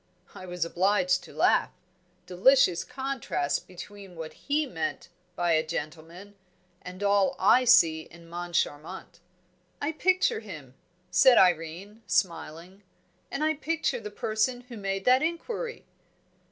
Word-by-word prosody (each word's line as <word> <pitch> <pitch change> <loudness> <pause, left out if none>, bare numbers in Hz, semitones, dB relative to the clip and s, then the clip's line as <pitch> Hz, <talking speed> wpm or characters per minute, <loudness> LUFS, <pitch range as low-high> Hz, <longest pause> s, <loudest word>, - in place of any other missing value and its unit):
I 185 - -10
was 175 -2 -2
obliged 185 +1 +1
to - - -13
laugh - - +2 0.6
delicious 185 0 +4
contrast 265 - -3
between 195 +1 -11
what 160 -1 -7
he 300 +2 -1
meant 165 - -4 0.3
by 175 -1 0
a 155 -1 +3
gentleman 165 +5 -7 0.5
and 185 +2 -8
all 200 -1 +2
I 245 +7 +4
see 165 -10 +5
in 170 0 -15
Moncharmont." 170 0 -4 0.6
"I 290 - -1
picture 370 +4 +1
him," 155 - -10 0.4
said 240 +8 +6
Irene, 180 +4 +1
smiling, 175 +1 -2 0.5
"and 290 - -3
I 315 0 +2
picture 320 0 -2
the 210 - -7
person 220 +4 -1
who 240 - -8
made 195 -1 -3
that 255 +1 +5
inquiry." 455 +9 -4
190 Hz, 125 wpm, -27 LUFS, 170-250 Hz, 0.6 s, said